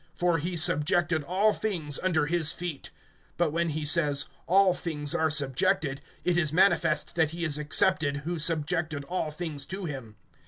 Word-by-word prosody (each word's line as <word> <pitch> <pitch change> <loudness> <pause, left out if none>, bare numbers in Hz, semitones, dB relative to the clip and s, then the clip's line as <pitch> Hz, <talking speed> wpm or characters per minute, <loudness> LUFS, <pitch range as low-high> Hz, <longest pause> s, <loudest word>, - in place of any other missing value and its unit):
For 175 -2 +1
he 175 +3 -3
subjected 160 +1 +2
all 200 +6 +2
things 165 -10 -2
under 170 -5 +1
his 160 -1 +2
feet. 170 -5 -6 0.5
(27)But 170 -3 +1
when 170 +1 -1
he 155 0 -3
says, 145 -2 +2 0.2
All 190 +1 +4
things 150 -5 -2
are 160 0 +1
subjected, 145 +1 +1 0.2
it 175 -1 +1
is 155 -4 +1
manifest 165 -2 +2
that 160 -3 +1
he 170 +2 -6
is 150 -2 0
excepted, 150 -1 +2
who 170 0 -3
subjected 160 -1 0
all 175 0 -3
things 155 -2 -6
to 190 0 -5
him. 130 -8 -7
160 Hz, 165 wpm, -27 LUFS, 150-175 Hz, 0.5 s, All